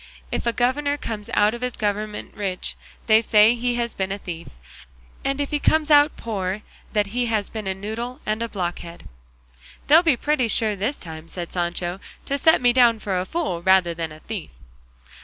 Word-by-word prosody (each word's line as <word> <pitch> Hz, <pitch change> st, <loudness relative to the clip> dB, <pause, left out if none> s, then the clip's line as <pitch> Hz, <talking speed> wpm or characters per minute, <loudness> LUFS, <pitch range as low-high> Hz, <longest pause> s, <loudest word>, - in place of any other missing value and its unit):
If -, -, -2 dB
a -, -, +4 dB
governor 285 Hz, +5 st, 0 dB
comes 215 Hz, -6 st, -5 dB
out 210 Hz, +1 st, +4 dB
of 240 Hz, -, -6 dB
his 250 Hz, -1 st, -2 dB
government 210 Hz, 0 st, -3 dB
rich, 195 Hz, -3 st, -3 dB, 0.3 s
they 220 Hz, 0 st, +6 dB
say 220 Hz, 0 st, +5 dB
he 245 Hz, 0 st, -1 dB
has 235 Hz, -1 st, -1 dB
been 190 Hz, 0 st, -2 dB
a 200 Hz, -, -2 dB
thief; 170 Hz, -4 st, -7 dB, 0.8 s
and 275 Hz, +1 st, -1 dB
if 285 Hz, -, -2 dB
he 295 Hz, -, 0 dB
comes 310 Hz, +1 st, +2 dB
out 290 Hz, 0 st, +6 dB
poor, 200 Hz, -2 st, -3 dB, 0.3 s
that 210 Hz, -1 st, 0 dB
he 245 Hz, 0 st, +1 dB
has 215 Hz, -3 st, -1 dB
been 215 Hz, -3 st, -5 dB
a 190 Hz, -, -1 dB
noodle 230 Hz, +6 st, -5 dB
and 215 Hz, +1 st, -1 dB
a 230 Hz, -, -2 dB
blockhead." 175 Hz, -3 st, -5 dB, 0.8 s
"They'll 310 Hz, +4 st, +7 dB
be 320 Hz, -8 st, +3 dB
pretty 290 Hz, -2 st, +1 dB
sure 215 Hz, -1 st, +2 dB
this 215 Hz, +9 st, -2 dB
time," 160 Hz, -1 st, -9 dB
said 175 Hz, 0 st, -6 dB
Sancho, 175 Hz, +1 st, -2 dB, 0.3 s
"to 280 Hz, +1 st, -1 dB
set 320 Hz, 0 st, +5 dB
me 245 Hz, -1 st, +4 dB
down 240 Hz, -3 st, +5 dB
for 195 Hz, -4 st, -2 dB
a 180 Hz, -, -2 dB
fool 295 Hz, -, -2 dB
rather 190 Hz, -1 st, +4 dB
than 165 Hz, -1 st, -4 dB
a 155 Hz, 0 st, -12 dB
thief." 215 Hz, -6 st, -6 dB
215 Hz, 195 wpm, -23 LUFS, 190-245 Hz, 0.8 s, They'll